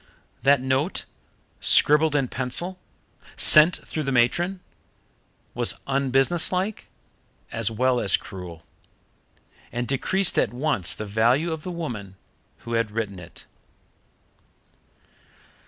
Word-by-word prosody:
That 140 +1 +3
note, 130 +7 -1 0.5
scribbled 150 +1 +4
in 135 -3 +1
pencil, 130 +10 -2 0.6
sent 155 +3 +6
through 155 - -4
the 135 -2 -2
matron, 170 +10 +1 0.9
was - - 0
unbusinesslike 140 +9 0 0.6
as 115 -2 0
well 125 +2 0
as 95 - +2
cruel, 90 -4 -10 1.1
and 120 0 -4
decreased 185 +7 +2
at - - 0
once 130 - 0
the 110 - -6
value 120 +10 +1
of 160 -1 -5
the 180 - -7
woman 120 - -6 0.5
who 115 - -7
had 115 -1 0
written 105 -3 -4
it. 85 -1 -13
130 Hz, 105 wpm, -24 LUFS, 115-160 Hz, 1.1 s, sent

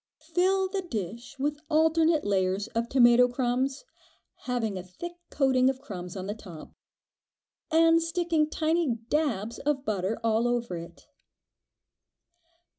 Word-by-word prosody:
Fill 380 +1 +3
the 385 +1 -3
dish 230 - -6
with 290 +2 -1
alternate 320 0 +3
layers 190 0 +1
of 230 +1 -2
tomato 245 -1 +6
crumbs, 255 - -1 0.6
having 235 -5 -1
a 185 - -4
thick 185 - -8 0.2
coating 260 -2 +3
of 265 -1 -2
crumbs 185 -8 -7
on 185 - -5
the 205 - -3
top, 180 -8 -11 1.0
and 330 +1 +5
sticking 330 -2 0
tiny 315 -5 +1
"dabs" 235 -8 -1
of 275 -2 -1
butter 205 0 -1
all 225 +1 +2
over 240 -5 -1
it. 170 0 -10
250 Hz, 125 wpm, -28 LUFS, 215-315 Hz, 1.0 s, tomato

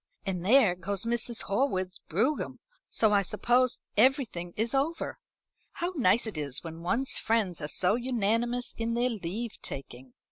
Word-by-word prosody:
And 185 -3 -2
there 220 -2 +5
goes 190 +2 -3
Mrs. 235 0 -1
Horwood's 190 -5 -1
brougham; 225 - -1 0.3
so 215 -2 +2
I 200 - +5
suppose 240 +6 +1
everything 220 -7 +2
is 225 +3 0
over. 290 +5 -1 0.5
How 350 +2 -3
nice 235 - +3
it 205 -8 -4
is 140 0 0
when 165 0 -8
one's 240 +10 +2
friends 210 -7 0
are 150 - -3
so 180 +5 +1
unanimous 240 0 0
in 230 0 -2
their 245 +1 +1
leave 215 +3 -5
taking." 130 -2 -7
220 Hz, 150 wpm, -29 LUFS, 180-245 Hz, 0.5 s, there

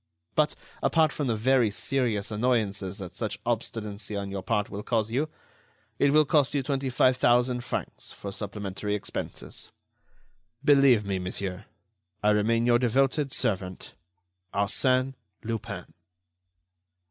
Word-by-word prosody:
But, 155 0 +2 0.3
apart 160 -2 +3
from 145 - -2
the 115 - +1
very 120 +1 +3
serious 115 -2 -1
annoyances 105 -4 0
that 90 -4 -7
such 110 +2 -3
obstinacy 105 -3 -3
on 100 -1 -3
your 100 -1 -3
part 105 0 0
will 100 - -6
cause 110 0 0
you, 145 +6 0 0.7
it 140 - +5
will 155 +1 +5
cost 145 0 +2
you 140 - +1
twenty 135 -1 -1
five 130 0 +3
thousand 125 0 +3
francs - - -5
for 100 - -7
supplementary 100 0 -3
expenses. 105 - -6 0.9
"Believe 135 -7 +6
me, 95 -1 -1
monsieur, 90 +2 -4 0.6
I 105 - +5
remain 115 +3 +2
your 120 0 +5
devoted 135 +3 +2
servant, 95 -8 -2 0.6
ARSÈNE 130 +6 +2 0.3
LUPIN." 115 -2 -5
115 Hz, 130 wpm, -27 LUFS, 100-130 Hz, 0.9 s, Believe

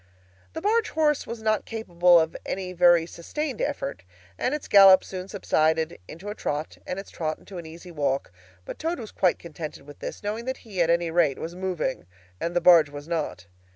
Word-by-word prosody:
The 320 - -5
barge 445 +3 +2
horse 300 -2 +1
was 230 -1 -6
not 215 -1 +1
capable 175 -6 +3
of 160 0 -1
any 185 -1 -4
very 175 -2 +5
sustained 255 - -5
effort, 115 - -3 0.3
and 255 - -1
its 300 - -6
gallop 195 -2 +8
soon 185 -1 -7
subsided 160 -5 0
into 185 +6 -8
a - - -3
trot, 150 -6 -4
and 180 - -3
its 195 - -8
trot 155 -2 -3
into 190 -3 -10
an 165 - -9
easy 170 +3 -11
walk; 140 -6 -1 0.3
but - - -8
Toad 330 +2 -1
was 220 -3 -8
quite 185 -2 +2
contented 155 -4 -8
with 145 -1 -13
this, - - -7
knowing 215 +3 -3
that 260 0 -3
he, 195 -5 -2
at 165 - +3
any 170 0 +2
rate, 160 -5 +2
was 165 - -6
moving, 180 - -3 0.3
and 170 +1 -3
the - - +4
barge 170 -4 +7
was 145 +1 -9
not. 155 - -3
175 Hz, 200 wpm, -26 LUFS, 160-210 Hz, 0.3 s, gallop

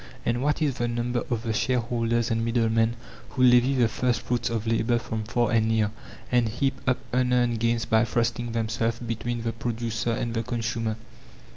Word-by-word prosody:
And 120 +1 0
what 150 +3 +1
is 140 -4 -1
the 120 - +1
number 120 +1 -1
of 120 -3 -1
the 115 -2 -1
shareholders 120 0 0
and 115 0 +1
middlemen 115 0 +2 0.3
who 130 - 0
levy 125 +2 +5
the 120 -3 +4
first 120 +2 0
fruits 120 -1 -1
of 115 -1 -2
labour 115 +1 +2
from 110 -2 -4
far 120 +1 0
and 110 -1 +3
near, 110 -2 +1 0.4
and 120 -2 +3
heap 135 +5 0
up 130 - +3 0.2
unearned 125 -2 +2
gains 115 0 +1
by 110 0 +3
thrusting 120 0 -1
themselves 115 0 -1
between 120 0 -3
the 115 0 -2
producer 115 0 -3
and 115 0 -2
the 115 - 0
consumer? 115 -1 -2
115 Hz, 180 wpm, -26 LUFS, 115-120 Hz, 0.4 s, levy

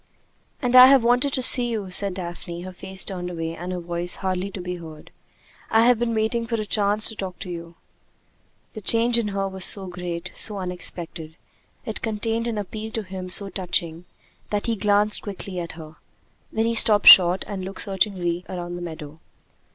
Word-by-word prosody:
"And 250 0 0
I 255 0 +10
have 270 -2 +5
wanted 245 +4 +2
to 255 - -1
see 245 -1 +5
you," 210 -5 -5
said 195 0 +3
Daphne, 175 -1 -7
her 185 - -8
face 190 +1 -5
turned 180 -2 -4
away 165 -1 -5
and 175 +2 -7
her 180 - -4
voice 175 0 -2
hardly 190 0 -3
to 195 - -9
be 180 0 -5
heard. 160 -3 -12 0.6
"I 225 +1 +3
have 245 -2 +3
been 235 -1 -1
waiting 225 +2 -1
for 230 - -2
a 215 - -3
chance 205 0 +2
to 220 - -3
talk 190 -3 -7
to 180 - -8
you." 170 -1 -9 1.0
The 215 - -8
change 235 +3 +3
in 225 - -2
her 195 -1 -2
was 190 -1 -3
so 195 +2 +5
great, 180 -1 -6
so 210 -2 +2
unexpected, 175 -3 -3 0.5
it 220 -3 -5
contained 225 +1 -2
an 230 -2 -3
appeal 215 +2 -6
to 220 - -3
him 185 -1 -8
so 195 +2 +4
touching, 175 -3 -3 0.4
that 205 -1 -2
he 230 - -1
glanced 210 0 +2
quickly 195 -2 -7
at 170 -1 -6
her. 155 -1 -12 0.5
Then 220 0 -1
he 230 - 0
stopped 215 -2 +4
short 180 0 +8
and 195 -2 -6
looked 190 +1 -7
searchingly 180 -3 -1
around 175 -1 -6
the - - -8
meadow. 160 -3 -9
190 Hz, 195 wpm, -23 LUFS, 175-220 Hz, 1.0 s, I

